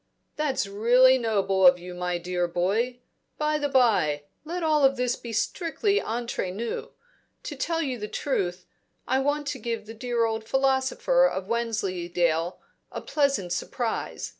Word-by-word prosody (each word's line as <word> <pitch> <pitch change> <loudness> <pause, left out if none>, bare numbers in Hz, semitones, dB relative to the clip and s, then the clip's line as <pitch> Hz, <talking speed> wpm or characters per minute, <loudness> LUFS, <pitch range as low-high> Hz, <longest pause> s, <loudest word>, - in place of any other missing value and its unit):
"That's 295 -7 0
really 245 +6 +5
noble 195 -5 +3
of 180 0 +7
you, 180 0 -9
my 180 0 -2
dear 175 0 -1
boy 210 +9 -1 0.4
By 305 0 0
the 290 -1 -1
bye, 205 - +3 0.2
let 340 +3 -4
all 300 -4 +4
this 250 -2 -1
be - - -11
very - - -5
strictly 390 - 0
entre 230 -4 -3
nous. 225 +6 -4 0.5
To 295 - -6
tell 330 +4 -1
you 260 -5 -3
the 210 - -4
truth. 185 -9 -2 0.4
I 260 - +2
want 290 +2 0
to 265 - -4
give 230 -2 -4
the 225 - -9
dear 235 0 0
old 225 0 -2
philosopher 270 - +2
of 190 - -3
Wensleydale 180 -7 -1 0.3
a - - -5
pleasant 275 - 0
surprise. 230 +5 -3
235 Hz, 155 wpm, -26 LUFS, 190-270 Hz, 0.5 s, of